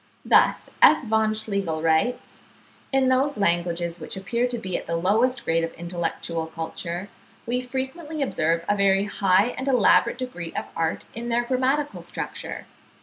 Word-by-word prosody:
Thus -, -, +4 dB
F. 310 Hz, -, +7 dB
von 220 Hz, -1 st, +2 dB
Schlegel 195 Hz, -7 st, -2 dB
writes: 165 Hz, +11 st, 0 dB, 0.5 s
"In 270 Hz, -1 st, +3 dB
those 270 Hz, +3 st, +2 dB
languages 175 Hz, -2 st, 0 dB
which 160 Hz, -, -7 dB
appear 235 Hz, +6 st, 0 dB
to 245 Hz, -1 st, -3 dB
be 190 Hz, -5 st, -4 dB
at -, -, -4 dB
the 170 Hz, -, -1 dB
lowest 220 Hz, +9 st, +1 dB
grade 165 Hz, 0 st, +1 dB
of 165 Hz, -, -3 dB
intellectual 170 Hz, -1 st, -3 dB
culture, 170 Hz, +3 st, -5 dB, 0.4 s
we 245 Hz, +2 st, -1 dB
frequently 270 Hz, +5 st, -4 dB
observe 165 Hz, -, 0 dB
a 205 Hz, -, +2 dB
very 195 Hz, -1 st, +3 dB
high 200 Hz, +1 st, +3 dB
and 260 Hz, -, -4 dB
elaborate 250 Hz, -2 st, +4 dB
degree 210 Hz, -10 st, -5 dB
of -, -, -3 dB
art 165 Hz, -1 st, -1 dB
in 235 Hz, +1 st, -5 dB
their 240 Hz, +1 st, +2 dB
grammatical 265 Hz, +4 st, 0 dB
structure. -, -, -5 dB
205 Hz, 155 wpm, -24 LUFS, 170-250 Hz, 0.5 s, F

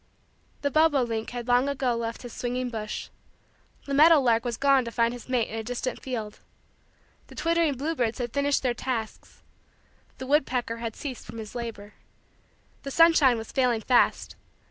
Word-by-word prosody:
The 285 Hz, -, 0 dB
bobo 310 Hz, -3 st, +4 dB
link 225 Hz, -2 st, -3 dB
had 245 Hz, -1 st, -6 dB
long 245 Hz, +3 st, +3 dB
ago 260 Hz, -3 st, 0 dB
left 230 Hz, +1 st, -4 dB
his 245 Hz, -, -9 dB
swinging 250 Hz, 0 st, -3 dB
bush. 215 Hz, -2 st, -5 dB, 0.8 s
The 280 Hz, -, -4 dB
meadow 310 Hz, +3 st, +7 dB
lark 235 Hz, -4 st, +2 dB
had 235 Hz, -2 st, -3 dB
gone 275 Hz, -2 st, +4 dB
to 235 Hz, -, -6 dB
find 230 Hz, 0 st, +1 dB
his 245 Hz, +1 st, -10 dB
mate 245 Hz, -3 st, +1 dB
in 225 Hz, -, -4 dB
a -, -, -5 dB
distant 245 Hz, +2 st, -4 dB
field. 225 Hz, -5 st, -5 dB, 0.9 s
The -, -, -14 dB
twittering 335 Hz, -3 st, +1 dB
bluebirds 260 Hz, -5 st, -1 dB
had 240 Hz, -3 st, -4 dB
finished 280 Hz, 0 st, +1 dB
their 250 Hz, -2 st, +1 dB
tasks. 240 Hz, -3 st, -5 dB, 0.7 s
The 260 Hz, -, -6 dB
woodpecker 255 Hz, -5 st, 0 dB
had 230 Hz, -1 st, -5 dB
ceased 265 Hz, -4 st, -6 dB
from -, -, -9 dB
his 215 Hz, -1 st, -8 dB
labor. 225 Hz, -4 st, -7 dB, 0.9 s
The 275 Hz, -, -6 dB
sunshine 305 Hz, -5 st, +5 dB
was 225 Hz, 0 st, -7 dB
failing 245 Hz, -4 st, +1 dB
fast. 245 Hz, +1 st, +2 dB
245 Hz, 170 wpm, -26 LUFS, 230-275 Hz, 0.9 s, meadow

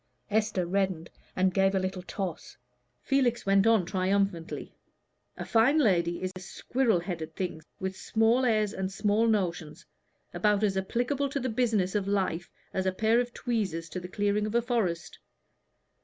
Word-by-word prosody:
Esther 210 Hz, -4 st, +1 dB
reddened, 185 Hz, -2 st, -1 dB, 0.2 s
and 185 Hz, 0 st, +2 dB
gave 195 Hz, +1 st, +3 dB
a -, -, +3 dB
little 185 Hz, 0 st, -3 dB
toss. 180 Hz, -2 st, -5 dB, 0.5 s
Felix 255 Hz, -4 st, +1 dB
went 195 Hz, +1 st, +4 dB
on 225 Hz, -5 st, +4 dB
triumphantly. 190 Hz, -2 st, -1 dB, 0.6 s
"A -, -, -5 dB
fine 240 Hz, +7 st, +4 dB
lady 175 Hz, -, +2 dB
is 185 Hz, -, -2 dB
a -, -, -6 dB
squirrel 225 Hz, +2 st, 0 dB
headed 165 Hz, -3 st, -5 dB
thing, 175 Hz, -4 st, -3 dB, 0.2 s
with 190 Hz, 0 st, -3 dB
small 225 Hz, +5 st, +2 dB
airs, 215 Hz, -4 st, +2 dB
and 190 Hz, 0 st, -3 dB
small 210 Hz, +3 st, +2 dB
notions, 175 Hz, -8 st, -1 dB, 0.5 s
about 210 Hz, -1 st, +2 dB
as 200 Hz, -2 st, +2 dB
applicable 245 Hz, +8 st, -1 dB
to 280 Hz, -, -2 dB
the 255 Hz, -1 st, -2 dB
business 220 Hz, -5 st, +1 dB
of 205 Hz, -2 st, -1 dB
life 190 Hz, -4 st, -1 dB, 0.2 s
as 190 Hz, 0 st, -1 dB
a -, -, +3 dB
pair 220 Hz, +5 st, +2 dB
of 245 Hz, 0 st, -1 dB
tweezers 200 Hz, -11 st, -2 dB
to 185 Hz, -, -4 dB
the 180 Hz, -, -7 dB
clearing 205 Hz, +2 st, 0 dB
of 215 Hz, -, -4 dB
a 235 Hz, -, +4 dB
forest. 185 Hz, -9 st, -2 dB
195 Hz, 165 wpm, -28 LUFS, 185-225 Hz, 0.6 s, went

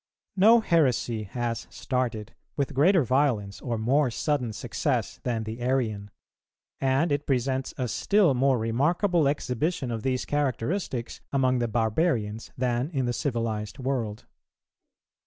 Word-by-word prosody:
_ -, -, -67 dB, 0.3 s
No 220 Hz, +5 st, +6 dB
heresy 130 Hz, -, +1 dB
has 115 Hz, +2 st, -3 dB
started 120 Hz, -5 st, -3 dB, 0.2 s
with 140 Hz, -2 st, -1 dB
greater 165 Hz, +5 st, +4 dB
violence 125 Hz, -6 st, 0 dB
or 120 Hz, -3 st, -2 dB
more 130 Hz, +5 st, +2 dB
sudden 125 Hz, -1 st, -1 dB
success 105 Hz, -, -2 dB
than 115 Hz, -3 st, -2 dB
the 110 Hz, +2 st, -6 dB
Arian; 115 Hz, -6 st, -1 dB, 0.7 s
and 135 Hz, +4 st, +2 dB
it 145 Hz, 0 st, -1 dB
presents 130 Hz, 0 st, -1 dB
a 125 Hz, -, -1 dB
still 195 Hz, -, +3 dB
more 130 Hz, +1 st, +3 dB
remarkable 150 Hz, -, +1 dB
exhibition 140 Hz, 0 st, -1 dB
of 115 Hz, -1 st, -3 dB
these 130 Hz, +1 st, -1 dB
characteristics 140 Hz, -, -2 dB
among 130 Hz, -2 st, +2 dB
the 120 Hz, -, 0 dB
barbarians 115 Hz, -1 st, 0 dB
than 125 Hz, +2 st, 0 dB
in 135 Hz, -6 st, -1 dB
the 120 Hz, -, 0 dB
civilized 115 Hz, -6 st, -2 dB
world. 125 Hz, -5 st, -3 dB
130 Hz, 135 wpm, -27 LUFS, 115-145 Hz, 0.7 s, No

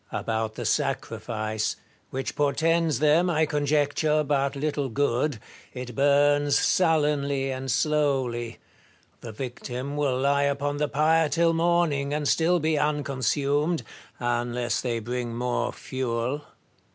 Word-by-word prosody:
About 110 Hz, -1 st, -2 dB
the -, -, -5 dB
sacrifice, 110 Hz, -1 st, -1 dB, 0.3 s
which 135 Hz, 0 st, -4 dB
portends 160 Hz, +1 st, +1 dB
them, 155 Hz, +6 st, +3 dB
I 160 Hz, -2 st, +2 dB
conjecture, 150 Hz, +1 st, +1 dB
but 140 Hz, -1 st, 0 dB
little 145 Hz, -1 st, -2 dB
good, 140 Hz, +1 st, 0 dB, 0.2 s
— -, -, -24 dB
it 125 Hz, -1 st, -6 dB
burns 145 Hz, +2 st, +3 dB
sullenly 145 Hz, -5 st, +1 dB
and 130 Hz, 0 st, -5 dB
slowly. 130 Hz, -4 st, 0 dB, 0.6 s
The 115 Hz, -, -8 dB
victim 125 Hz, +3 st, -5 dB
will 140 Hz, -3 st, 0 dB
lie 140 Hz, +1 st, +2 dB
upon 140 Hz, +1 st, -1 dB
the 150 Hz, 0 st, 0 dB
pyre 155 Hz, +2 st, +2 dB
till 165 Hz, +1 st, +2 dB
morning, 165 Hz, -4 st, +1 dB
and 150 Hz, -1 st, -1 dB
still 170 Hz, +4 st, +3 dB
be 155 Hz, -1 st, +1 dB
unconsumed, 145 Hz, +2 st, 0 dB, 0.4 s
unless 120 Hz, -1 st, -1 dB
they 120 Hz, -2 st, -1 dB
bring 120 Hz, +1 st, -4 dB
more 120 Hz, 0 st, -1 dB
fuel. 130 Hz, +2 st, -3 dB
140 Hz, 125 wpm, -26 LUFS, 125-150 Hz, 0.6 s, them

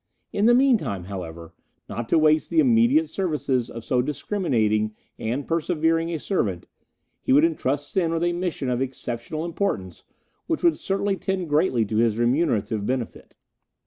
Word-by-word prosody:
In 205 Hz, -, +1 dB
the 240 Hz, -, +6 dB
meantime, 205 Hz, -, +2 dB
however, 85 Hz, -3 st, -8 dB, 0.3 s
not 120 Hz, -1 st, -5 dB
to -, -, +4 dB
waste 155 Hz, 0 st, +3 dB
the -, -, -3 dB
immediate 260 Hz, +3 st, +4 dB
services 150 Hz, -, -1 dB
of 115 Hz, -, -8 dB
so 125 Hz, +1 st, +1 dB
discriminating 125 Hz, -, 0 dB, 0.2 s
and 125 Hz, +6 st, -2 dB
persevering 165 Hz, 0 st, 0 dB
a 165 Hz, -, -1 dB
servant, 105 Hz, -, -2 dB, 0.5 s
he -, -, -1 dB
would 145 Hz, +4 st, +6 dB
entrust 145 Hz, -3 st, -1 dB
Sen 170 Hz, -4 st, +1 dB
with 165 Hz, 0 st, 0 dB
a 175 Hz, 0 st, +1 dB
mission 175 Hz, -6 st, -3 dB
of 125 Hz, +1 st, -1 dB
exceptional 130 Hz, +3 st, -4 dB
importance, 135 Hz, -, -3 dB, 0.4 s
which 325 Hz, 0 st, -1 dB
would 340 Hz, -2 st, +3 dB
certainly 195 Hz, 0 st, -1 dB
tend 185 Hz, -4 st, -2 dB
greatly 145 Hz, -7 st, +2 dB
to 110 Hz, +1 st, -2 dB
his 115 Hz, -1 st, +2 dB
remunerative 120 Hz, -5 st, +1 dB
benefit. 125 Hz, +1 st, -4 dB
150 Hz, 155 wpm, -24 LUFS, 115-180 Hz, 0.5 s, the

